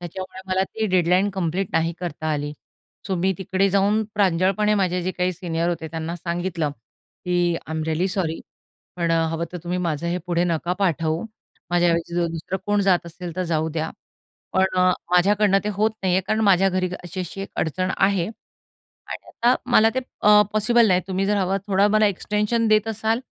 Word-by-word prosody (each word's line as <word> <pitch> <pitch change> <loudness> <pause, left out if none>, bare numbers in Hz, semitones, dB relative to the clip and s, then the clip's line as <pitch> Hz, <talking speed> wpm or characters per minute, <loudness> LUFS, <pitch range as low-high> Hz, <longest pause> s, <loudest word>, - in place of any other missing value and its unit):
त्याच्यामुळे 185 +2 -7
मला 185 0 +1
ती 220 +2 -3
डेडलाईन 185 +1 +2
कंप्लीट 185 0 -2
नाही 165 +1 +1
करता 170 -3 -5
आली. 145 0 -3 0.5
सो 190 - -1
मी 185 +2 +1
तिकडे 190 +1 +1
जाऊन 200 +3 +2
प्रांजळपणे 195 +2 +2
माझे 180 -2 +1
जे 185 - -1
काही 180 0 0
सीनियर 170 -1 -2
होते 165 -2 -3
त्यांना 165 +1 -4
सांगितलं, 170 -2 -2
की 175 +7 -3
आय - - -10
एम 160 - -2
रिअली 160 +4 0
सॉरी 180 -4 -2 0.6
पण 170 -1 0
अ, - - +4 0.2
हवं 165 +1 -2
तर 180 - -5
तुम्ही 180 +1 -2
माझं 170 -2 -2
हे 175 +1 -1
पुढे 175 0 +1
नका 170 0 -1
पाठवू 165 -1 0 0.5
माझ्या 175 0 +3
ऐवजी 170 0 -1
जर 175 0 +1
दुसरं 165 +3 -4
कोण 205 0 +2
जात 180 -3 +2
असेल 170 0 -8
तर 185 - 0
जाऊ 160 -2 0
द्या, 160 0 -3 0.6
पण 190 0 +3
अ, 185 0 +5 0.2
माझ्याकडनं 195 +2 +4
ते - - -1
होत 215 +2 +2
नाहीये, 185 0 +2
कारण 215 +4 -1
माझ्या 195 -1 +5
घरी 185 -1 0 0.2
अशी-अशी 180 +2 -6
एक 195 - -6
अडचण 185 +4 -1
आहे 190 -3 +2
आणि 220 - -13
आता 240 +2 +2 0.2
मला 225 -1 +6
ते 260 - +1 0.2
अ, 210 0 +7
पॉसिबल 230 +2 +4
नाही 180 -1 +3
तुम्ही 190 +1 0
जर 210 +1 +2
हवं 195 0 +1
थोड 195 -1 +2
मला 215 0 +5
एक्सटेंशन 210 +3 0
देत 215 +1 +3
असाल 220 +2 0
185 Hz, 190 wpm, -23 LUFS, 170-200 Hz, 0.6 s, अ